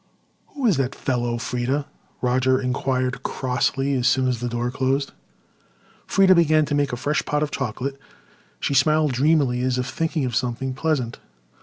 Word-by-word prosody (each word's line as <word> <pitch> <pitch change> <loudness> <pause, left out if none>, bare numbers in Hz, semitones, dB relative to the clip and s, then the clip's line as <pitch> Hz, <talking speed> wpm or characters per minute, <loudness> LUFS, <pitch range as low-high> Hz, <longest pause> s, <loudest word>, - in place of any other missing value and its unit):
"Who 280 -3 -2
is 200 - +4
that 135 -1 -1
fellow, 120 -2 -1
Freda?" 125 +4 -2 0.4
Roger 130 +1 +2
inquired 130 0 -1
crossly, 135 +1 -1
as 125 -2 +1
soon 130 0 +3
as 125 -2 -1
the 120 +1 -3
door 120 +1 -2
closed. 135 +1 0 1.0
Freda 190 -1 +5
began 155 -2 +4
to 145 - -3
make 145 -1 +1
a 120 - -3
fresh 145 +5 0
pot 150 0 0
of 150 - -3
chocolate. 135 +2 -3 0.6
She - - -1
smiled 155 +2 +3
dreamily 135 -2 +2
as 130 0 0
if 125 - -1
thinking 160 +1 -1
of 125 -3 -3
something 130 +2 -1
pleasant. 135 -4 -1
130 Hz, 165 wpm, -23 LUFS, 125-145 Hz, 1.0 s, Freda